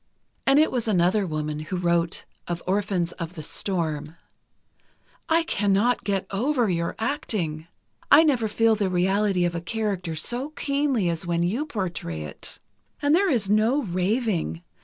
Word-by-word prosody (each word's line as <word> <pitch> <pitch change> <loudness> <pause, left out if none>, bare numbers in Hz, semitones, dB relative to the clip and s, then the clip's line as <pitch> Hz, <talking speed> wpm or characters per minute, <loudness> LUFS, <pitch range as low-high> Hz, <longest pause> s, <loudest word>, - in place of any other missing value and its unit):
And 270 +1 +6
it 310 +1 +4
was 240 -3 0
another 190 0 +2
woman 155 -1 -3
who 155 +4 -4
wrote 170 -1 0 0.2
of 170 -1 -3
"Orphans 190 -3 0
of 165 +2 -5
the 155 - -6
Storm": 160 -3 -2 1.1
I 330 +1 +4
cannot 210 -3 +1
get 195 -2 -1
over 245 +4 +1
your 170 -1 -1
acting: 210 - -2 0.4
I 300 +3 +9
never 255 -8 +2
feel 225 +1 +3
the 205 -3 0
reality 190 +1 +2
of 175 - -1
a 170 - -3
character 185 -3 -2
so 245 - -2
keenly 280 -8 0
as 170 +1 -2
when 170 0 +1
you 235 - -1
portray 170 - -3
it. 75 - -8 0.4
And 290 0 +2
there 385 +3 +4
is 230 - +2
no 220 +8 +3
raving. 185 - -1
195 Hz, 155 wpm, -25 LUFS, 170-235 Hz, 1.1 s, I